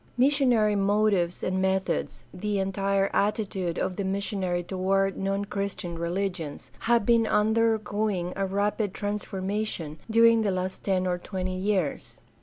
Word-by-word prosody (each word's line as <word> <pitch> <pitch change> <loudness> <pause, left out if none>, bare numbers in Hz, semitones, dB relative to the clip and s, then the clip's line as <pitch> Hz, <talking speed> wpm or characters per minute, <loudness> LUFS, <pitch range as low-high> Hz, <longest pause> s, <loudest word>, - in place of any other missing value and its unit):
Missionary 250 -6 +3
motives 200 -3 +1
and 185 +1 0
methods, 190 0 -1
the 205 +3 -2
entire 195 0 0
attitude 195 -4 0
of 185 -1 -2
the 200 - -1
missionary 190 -2 -1
toward 195 +1 0
non 195 +1 -1
Christian 200 -4 -4
religions, 170 -3 -3
have 235 -2 +2
been 230 -1 +4
under 220 +2 +3
going 205 -4 -2
a 195 0 -1
rapid 205 +1 -1
transformation 200 -5 -3
during 230 0 +5
the 210 - +1
last 185 0 -3
ten 185 -2 +1
or 180 -1 0
twenty 185 0 -4
years. 185 -5 -1
195 Hz, 135 wpm, -27 LUFS, 185-210 Hz, -, during